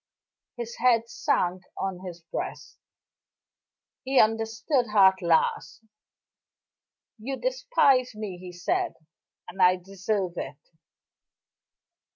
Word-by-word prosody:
His 235 -1 -6
head 230 -2 +3
sank 180 -5 0 0.2
on 190 -2 -3
his 175 -2 -8
breast; 165 - -6 1.2
he 265 0 +2
understood 225 +4 +1
her 200 -3 +7
at 190 - -18
last. 165 +2 +1 1.4
"You 265 +5 -4
despise 275 - +2
me," 205 -4 -6
he 180 0 -9
said, 345 - -1 0.5
"and 190 - -6
I 180 0 +6
deserve 190 0 -3
it." - - -5
215 Hz, 100 wpm, -26 LUFS, 180-250 Hz, 1.4 s, her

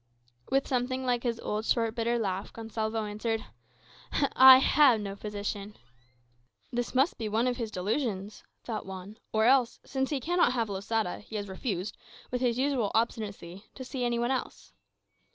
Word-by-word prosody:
With 270 0 +1
something 255 0 -1
like 245 -1 +1
his 235 -2 -2
old 210 +1 -2
short, 230 -1 +1
bitter 235 +1 0
laugh, 195 -3 -2
Gonsalvo 225 -1 -3
answered 220 +2 -2 0.9
"I 260 0 +11
have 265 -3 +5
no 200 -1 -5
physician." 205 0 -5 0.9
"This 245 +1 -3
must 270 +6 +2
be 220 -2 -2
one 225 +3 +1
of 250 -1 0
his 230 -3 -3
delusions," 210 0 -2 0.2
thought 215 -4 -5
Juan; 190 +3 -8
"or 220 0 +2
else, 250 -1 +4
since 265 -1 -1
he 290 - -1
cannot 345 -1 +2
have 230 -4 -1
Losada, 200 0 -2
he 220 - -11
has 205 -1 -3
refused, 190 0 -4 0.3
with 250 0 -2
his 245 -2 +1
usual 260 -5 +1
obstinacy, 205 -4 -2
to 260 - -7
see 255 0 -4
any 240 -1 +1
one 240 +2 0
else." 260 - -4
230 Hz, 165 wpm, -29 LUFS, 210-250 Hz, 0.9 s, I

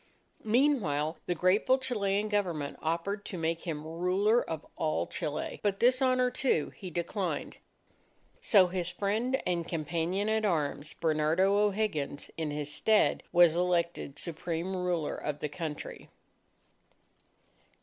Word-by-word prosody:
Meanwhile, 210 - +1
the 175 - 0
grateful 190 +9 +3
Chilean 210 -6 0
Government 175 -9 -1
offered 170 +6 -2
to 185 - -5
make 165 +2 -2
him 155 -2 -3
ruler 185 +8 +2
of 160 -2 -5
all 155 -1 0
Chile. 150 -1 -4
But 200 -2 0
this 255 +2 +4
honour, 255 -1 +3
too, 245 - 0
he 185 - -7
declined. 175 +3 -3 0.8
So 205 - +6
his 180 -1 -2
friend 220 +8 0
and 170 -2 -1
companion 170 +5 -1
at 220 0 +1
arms, 155 -5 -1
Bernardo 160 +5 +2
O'Higgins, 205 -9 0
in 160 -2 -2
his 145 0 -3
stead, 220 -1 +3
was 175 -2 +6
elected 170 -4 0
Supreme 170 +2 -3
Ruler 180 -4 -1
of 150 -1 -4
the 150 - -3
country. 155 -1 -6
180 Hz, 130 wpm, -30 LUFS, 160-205 Hz, 0.8 s, So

